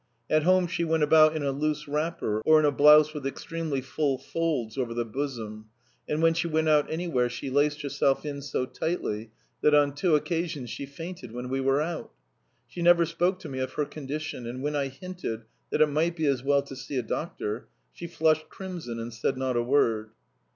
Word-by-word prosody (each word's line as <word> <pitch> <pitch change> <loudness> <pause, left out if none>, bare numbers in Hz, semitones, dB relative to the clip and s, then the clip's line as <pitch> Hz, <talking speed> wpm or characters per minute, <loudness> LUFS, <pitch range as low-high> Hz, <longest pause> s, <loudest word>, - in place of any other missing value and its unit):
At 155 - +4
home 185 +3 +4
she 170 0 -2
went 160 -1 +1
about 155 +1 +6
in 155 - -2
a 140 - +1
loose 150 +2 -2
wrapper 150 -8 -1
or 155 0 +6
in 155 - +3
a 145 - +4
blouse 150 +2 +6
with 150 -3 -6
extremely 155 -1 -3
full 140 +1 -1
folds 145 -9 -2
over 120 -3 -2
the 120 0 -1
bosom, 110 -4 -5 0.4
and 155 +2 0
when 165 0 +5
she 165 +1 -1
went 160 -1 +1
out 150 -1 +3
anywhere 160 -7 0
she 125 +2 -5
laced 145 +2 +1
herself 140 0 +1
in 140 -1 -4
so 130 -2 -2
tightly 115 -9 -3 0.3
that 150 0 +5
on 145 -1 +4
two 155 +3 +2
occasions 155 -5 -2
she 140 - -5
fainted 150 -4 -8
when 125 +1 -5
we 135 +1 -1
were 135 +2 +2
out. 165 0 -5 0.6
She 175 - -7
never 170 0 +6
spoke 175 +3 0
to - - -7
me 130 -1 -5
of 130 - -3
her 150 - 0
condition, 145 -3 -5
and 125 +3 -5
when 150 0 -1
I 140 -1 0
hinted 135 -5 -6 0.3
that - - 0
it 155 - +7
might 160 +3 0
be 160 -2 -1
as 135 -3 +2
well 140 0 +3
to 140 -1 -9
see 135 +1 -5
a 125 - 0
doctor, 110 -4 -4 0.3
she 170 - -7
flushed 155 -2 +1
crimson 175 -11 -6
and 115 +1 -6
said 115 +3 -1
not 130 -1 -1
a 120 - +2
word. 115 -4 +2
145 Hz, 210 wpm, -27 LUFS, 130-160 Hz, 0.6 s, it